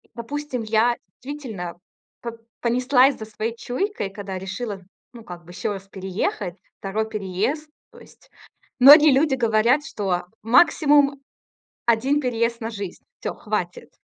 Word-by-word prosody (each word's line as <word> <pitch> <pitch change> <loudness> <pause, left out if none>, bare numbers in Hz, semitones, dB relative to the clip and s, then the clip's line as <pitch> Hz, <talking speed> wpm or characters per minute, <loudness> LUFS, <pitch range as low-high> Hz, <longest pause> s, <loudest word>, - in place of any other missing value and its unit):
допустим, 255 +1 -4
я 225 +2 +2 0.3
действительно 240 -11 -6 0.5
п 235 - -4 0.3
понеслась 255 +3 +3
за 220 - -7
своей 220 +1 -4
чуйкой, 245 - -3
когда 195 -1 -6
решила, 195 +2 -5 0.3
ну 235 -2 -11
как 175 -4 -10
бы, 175 - -12
ещё 185 +3 -3
раз 195 0 -9
переехать, 190 -1 -3 0.2
2 215 +3 -2
переезд. 215 - -2 0.2
То - - -15
есть - - -19 0.5
многие 295 +3 +9
люди 270 0 +3
говорят, 235 +4 +2
что 185 -4 -2 0.2
максимум 285 +2 +4 0.6
1 250 +5 +2
переезд 235 -3 -1
на 225 - -4
жизнь. 200 -5 -7 0.2
Всё, - - -3
хватит. 485 - -4
230 Hz, 130 wpm, -23 LUFS, 200-270 Hz, 0.6 s, многие